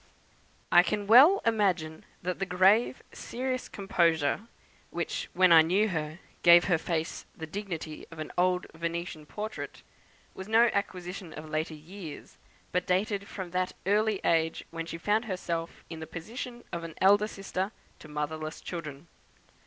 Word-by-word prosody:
I 175 - +9
can 205 +4 -2
well 270 - +8
imagine 185 -8 +1 0.2
that 180 +1 -2
the 195 - 0
grave 190 +8 +3
serious 255 +1 -4
composure, 170 -1 +1 0.4
which, - - -3
when 185 0 +5
I 165 -1 +10
knew 190 +7 +2
her, 155 -3 -3 0.2
gave 170 0 +8
her 175 -4 +2
face 165 -1 -3
the 160 - -5
dignity 165 -3 -6
of 165 - -12
an 155 - -5
old 180 0 +2
Venetian 165 -1 -4
portrait, 215 +5 -6 0.5
was 190 - -8
no 230 +2 +5
acquisition 180 -3 -4
of 155 +1 -8
later 155 +1 -2
years, 160 - -10 0.3
but 180 +1 0
dated 200 +2 0
from 185 -3 -6
that 185 0 -1
early 210 +1 +2
age 165 -1 +1
when 165 0 -5
she 165 - -5
found 210 +6 +1
herself 170 -4 -4
in 165 - -8
the 160 - -7
position 235 +9 -7
of 170 -1 -3
an 165 -1 -7
elder 205 +2 +5
sister 195 -1 -3 0.3
to - - -12
motherless 155 +1 -4
children. 155 -3 -7
180 Hz, 155 wpm, -29 LUFS, 160-205 Hz, 0.5 s, I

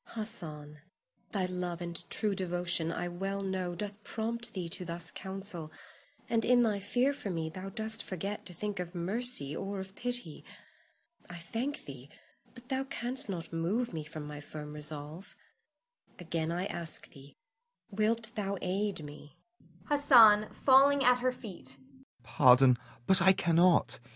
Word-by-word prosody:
Hassan, 155 -10 -6 0.5
thy 195 -3 0
love 180 -1 -4
and 170 0 -5
true 210 -2 0
devotion, 175 -3 +2
I 175 +1 -3
well 195 +3 -4
know, 185 -2 -3
doth 205 +3 -6
prompt 230 0 -4
thee 180 -3 -3
to 170 - 0
thus 170 -1 -1
counsel, 190 -4 -3 0.6
and 225 -1 +1
in 245 -1 +4
thy 210 -3 0
fear 245 +8 +1
for 210 - -6
me 165 -3 -3
thou 185 +3 -7
dost 220 +2 +1
forget 195 +3 -5
to 180 - -5
think 205 +1 -4
of 180 0 -6
mercy 185 - +3
or 195 +2 -4
of 190 0 -8
pity. 245 -10 -1 0.9
I 175 - -8
thank 235 - -4
thee; - - -10 0.5
but 245 0 -14
thou 265 0 -1
canst 260 -3 0
not 170 -3 -6
move 185 +8 -1
me 160 -2 -4
from 150 0 -8
my 150 0 -8
firm 150 0 -9
resolve. 150 +3 -5 0.8
Again 165 -2 -3
I 175 +2 -2
ask 170 -4 -2
thee, 140 0 -15 0.6
Wilt 220 +2 +1
thou 200 -3 -2
aid 195 -1 -2
me? 145 0 -12 0.5
Hassan 230 -8 +6
[falling 275 +1 +4
at 250 0 +4
her 255 +1 +1
feet]. 220 -7 -10 0.5
Pardon, 125 -3 +5 0.3
but 190 +6 +4
I 190 +2 +7
cannot. 170 0 +3
190 Hz, 150 wpm, -31 LUFS, 165-220 Hz, 0.9 s, I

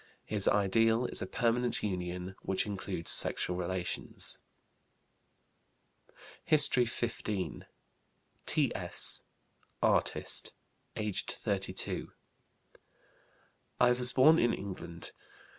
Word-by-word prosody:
His 105 -2 0
ideal 115 +4 +3
is - - -3
a 95 - -3
permanent 120 +2 0
union 90 -2 -4
which 95 - -1
includes 95 -4 -2
sexual 90 - +2
relations. 90 0 -3 2.1
HISTORY 150 -6 +5
XV. 115 -4 -3 0.8
T.S., - - +3 0.6
artist, - - 0 0.4
aged 105 -3 -3
32. - - -3 1.7
"I 125 - +5
was 125 0 +3
born 155 +5 +6
in 120 - +2
England. 85 -4 -6
105 Hz, 80 wpm, -31 LUFS, 95-120 Hz, 2.1 s, born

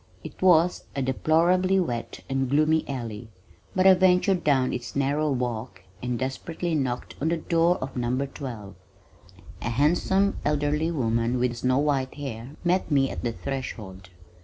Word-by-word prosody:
It - - -10
was 180 -1 +4
a 135 - -1
deplorably 175 +8 +2
wet 120 -10 -3
and 135 -1 -1
gloomy 155 +3 +2
alley, 115 -4 -5 0.5
but 185 0 +2
I 190 - +9
ventured 185 0 +3
down 135 -3 +2
its 125 0 -5
narrow 145 +2 +1
walk 120 -7 -3 0.2
and 125 -1 -2
desperately 160 +7 -3
knocked 130 -5 -2
on 155 - +1
the 170 - +1
door 170 +2 +2
of 135 +1 -6
No. 125 +2 0
12. 120 -8 -8 0.9
A 115 - -2
handsome 175 - +2
elderly 150 +2 +1
woman 115 -5 0
with 120 -1 0
snow 130 +2 +1
white 140 -3 0
hair 135 -1 -7
met 180 +2 +1
me 135 -3 +2
at - - -6
the 120 - 0
threshold. 110 -8 -6
135 Hz, 155 wpm, -26 LUFS, 125-165 Hz, 0.9 s, I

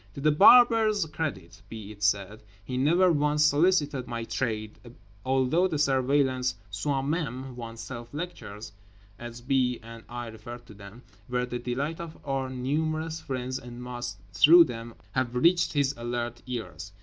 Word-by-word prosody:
To - - -6
The 155 +2 +3
Barber's 220 +2 +6
credit 155 - -5
be 110 -2 -8
it 100 -1 -14
said: 100 +1 0 0.2
he 130 - -5
never 170 +8 +4
once 150 -1 +2
solicited 150 -4 +2
my 115 -1 -4
trade, 110 -2 -3 0.4
although 135 +7 +2
the 160 -4 -2
Surveillant's 130 -2 +1 0.2
"Soi 135 +6 -1
même" 135 -4 -3
(oneself) 115 0 -8
lectures 145 - -7 0.5
(as 120 0 -8
B. 125 -1 +1
and 115 0 -11
I 120 0 -5
referred 120 +2 -10
to 105 - -13
them) 100 +4 -13 0.3
were 125 0 0
the 125 0 -5
delight 135 +6 -3
of 170 -1 -8
our 135 -2 -2
numerous 155 +5 -2
friends 130 -1 -4
and 120 0 -10
must, 120 -3 -5 0.2
through 160 - +8
them, 115 -4 -7 0.2
have 125 +1 -1
reached 170 +7 +3
his 140 -2 +1
alert 120 0 -4
ears. 115 -4 -6
130 Hz, 150 wpm, -27 LUFS, 120-150 Hz, 0.5 s, through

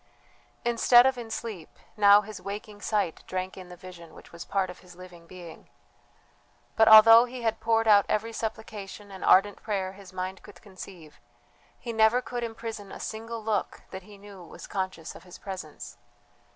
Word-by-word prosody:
Instead 240 +1 +5
of 265 0 +2
in 235 -2 -8
sleep, 220 -7 -7 0.2
now 205 -1 +6
his 210 -1 -10
waking 205 +1 -8
sight 205 -7 -2
drank 185 0 -4
in 185 -1 -11
the 180 - -10
vision 170 -2 -13
which - - -15
was 170 0 -9
part 190 -2 -1
of 180 - -14
his 180 -1 -16
living 175 -2 -14
being. 175 -2 -12 1.1
But 220 - +4
although 225 +2 +9
he 250 0 -9
had 225 -1 -1
poured 225 0 +1
out 205 -2 +5
every 225 +2 -1
supplication 210 -2 -7
and 190 - -9
ardent 200 +2 +4
prayer 195 -3 -3
his 195 -1 -14
mind 185 +1 -5
could 205 - -15
conceive, 185 -5 -13 0.6
he 235 - -6
never 220 +2 +4
could 245 0 -5
imprison 225 -3 -7
a - - -9
single 225 +1 -6
look 210 -3 -2
that 190 - -7
he 205 +2 -15
knew 200 -2 -13
was 165 - -12
conscious 185 -4 -5
of - - -13
his 180 0 -13
presence. 185 -6 -9
205 Hz, 180 wpm, -27 LUFS, 185-225 Hz, 1.1 s, although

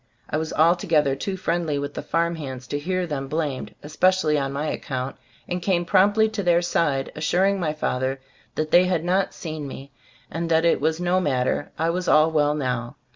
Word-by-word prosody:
I 150 - +1
was 160 0 -3
altogether 160 -4 +3
too 190 +7 -4
friendly 170 -4 -1
with 145 0 -4
the - - -4
farm 170 +1 0
hands 130 -4 -6
to 145 - -2
hear 185 +4 -1
them 140 -4 -4
blamed, 150 -3 -3
especially 155 +1 +2
on 135 -2 -1
my 140 +2 -3
account, 130 -3 -3 0.3
and 180 0 -3
came 175 -1 +1
promptly 205 +4 +4
to 215 -1 -3
their 175 -2 +3
side, 145 -6 0
assuring 190 +6 +1
my 155 -4 -1
father 135 -3 -2 0.4
that 155 0 -2
they 180 +1 +6
had 180 -3 0
not 185 +2 +1
seen 155 -3 -6
me, 135 +1 -9 0.4
and 165 +1 -3
that 165 0 +3
it 170 - +3
was 160 +2 +1
"no 180 +1 +2
matter," 130 -2 0
I 165 +1 +1
was 180 +1 -3
"all 155 +1 +5
well 150 -1 +2
now." 125 -4 -3
160 Hz, 195 wpm, -24 LUFS, 145-175 Hz, 0.4 s, they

